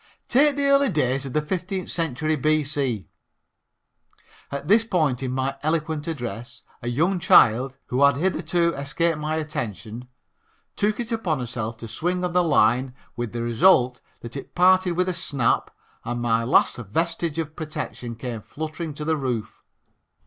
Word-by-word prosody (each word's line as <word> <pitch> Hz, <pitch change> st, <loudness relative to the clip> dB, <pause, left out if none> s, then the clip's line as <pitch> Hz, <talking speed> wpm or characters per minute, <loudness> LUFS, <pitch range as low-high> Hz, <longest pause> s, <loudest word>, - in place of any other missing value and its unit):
Take 285 Hz, +3 st, +4 dB
the 285 Hz, 0 st, 0 dB
early 280 Hz, -1 st, +4 dB
days 135 Hz, -4 st, 0 dB
of 130 Hz, -, -7 dB
the 150 Hz, -, +1 dB
fifteenth 185 Hz, +3 st, -3 dB
century 155 Hz, -1 st, 0 dB
B.C. 145 Hz, -6 st, 0 dB, 0.7 s
" -, -, -31 dB
At 140 Hz, +1 st, -5 dB
this 220 Hz, +4 st, +5 dB
point 155 Hz, -, 0 dB
in 130 Hz, -1 st, -2 dB
my 130 Hz, +1 st, -1 dB
eloquent 155 Hz, 0 st, -1 dB
address 120 Hz, -6 st, -6 dB, 0.2 s
a 120 Hz, -, -6 dB
young 165 Hz, +10 st, +1 dB
child, 130 Hz, -3 st, +5 dB
who 125 Hz, +2 st, -1 dB
had 140 Hz, -1 st, +6 dB
hitherto 170 Hz, +1 st, +1 dB
escaped 150 Hz, +4 st, -1 dB
my 155 Hz, +1 st, -2 dB
attention, 120 Hz, -, -5 dB, 0.7 s
took 210 Hz, +2 st, 0 dB
it 235 Hz, 0 st, -4 dB
upon 185 Hz, -, -1 dB
herself 115 Hz, -2 st, -4 dB
to 115 Hz, -, -8 dB
swing 180 Hz, +9 st, -1 dB
on 175 Hz, -, -3 dB
the 180 Hz, 0 st, +4 dB
line 125 Hz, -4 st, +2 dB, 0.2 s
with 120 Hz, -2 st, -4 dB
the 115 Hz, 0 st, -3 dB
result 125 Hz, +1 st, +4 dB, 0.2 s
that 120 Hz, +1 st, -9 dB
it 135 Hz, -, -8 dB
parted 185 Hz, 0 st, +4 dB
with 180 Hz, +2 st, 0 dB
a 185 Hz, -, 0 dB
snap 135 Hz, -8 st, 0 dB, 0.3 s
and 120 Hz, +1 st, -3 dB
my 115 Hz, -1 st, +1 dB
last 125 Hz, -, +3 dB
vestige 165 Hz, -, -2 dB
of 160 Hz, -1 st, -3 dB
protection 150 Hz, -6 st, -5 dB
came 115 Hz, -1 st, -5 dB
fluttering 155 Hz, -, -6 dB
to 150 Hz, -, -5 dB
the 160 Hz, 0 st, +2 dB
roof. 125 Hz, -6 st, -3 dB
150 Hz, 165 wpm, -24 LUFS, 125-170 Hz, 0.7 s, had